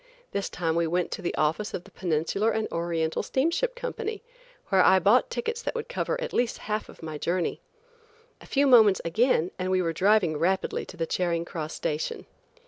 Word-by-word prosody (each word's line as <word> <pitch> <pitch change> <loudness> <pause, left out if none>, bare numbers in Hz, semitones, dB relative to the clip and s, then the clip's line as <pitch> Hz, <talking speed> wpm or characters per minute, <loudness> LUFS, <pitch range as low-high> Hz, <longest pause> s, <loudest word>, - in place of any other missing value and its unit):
This 200 - -2
time 165 -2 -1
we 170 0 +2
went 175 +2 0
to - - -4
the 175 - -2
office 160 +8 0
of 175 - -5
the - - -17
Peninsular 175 +5 0
and 220 -1 -1
Oriental 165 -1 -1
Steamship 335 - 0
Company, 455 -3 -4 0.5
where 190 -1 +5
I 190 +1 +6
bought 205 - +4
tickets 470 0 -3
that - - -3
would 465 0 -4
cover - - -2
at - - -4
least 245 -1 +1
half 215 0 -2
of - - -14
my 155 -2 -5
journey. 175 +2 -1 0.8
A - - -13
few 280 +1 +2
moments 225 -7 +6
again 180 -1 +2
and 185 0 -1
we 185 0 +2
were 165 -2 0
driving 185 -3 +3
rapidly 185 +5 0
to - - -11
the 165 - -1
Charing 170 0 -1
Cross 160 -3 -5
station. 150 +1 -3
185 Hz, 195 wpm, -27 LUFS, 165-250 Hz, 0.8 s, I